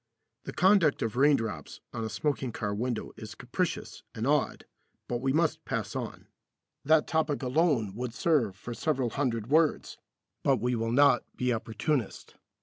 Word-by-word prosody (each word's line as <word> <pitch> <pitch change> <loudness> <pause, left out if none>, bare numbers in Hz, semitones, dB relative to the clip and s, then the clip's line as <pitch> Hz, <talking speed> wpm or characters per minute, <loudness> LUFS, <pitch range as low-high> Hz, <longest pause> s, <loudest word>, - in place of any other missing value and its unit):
The - - -5
conduct 185 -5 +4
of 115 -1 -2
raindrops 120 - +1
on 115 - -3
a 110 - -3
smoking 130 +4 -1
car 105 -2 -3
window 120 +2 -3
is 110 -1 -8
capricious 165 +8 -3
and 110 +1 -3
odd, 145 0 +1 0.4
but 120 - -2
we 135 0 +1
must 160 +2 +1
pass - - -3
on. - - -5 0.6
That 155 +1 +4
topic 155 -3 0
alone 130 - +1
would 120 +2 -5
serve 130 - +1
for 120 +5 -7
several 130 -3 -1
hundred 120 -6 -1
words, 160 0 +2 0.4
but 135 -2 +3
we 125 +3 0
will 115 -1 -1
not 140 0 +5
be 125 -1 0
opportunist. 115 +2 -2
125 Hz, 155 wpm, -29 LUFS, 115-150 Hz, 0.6 s, not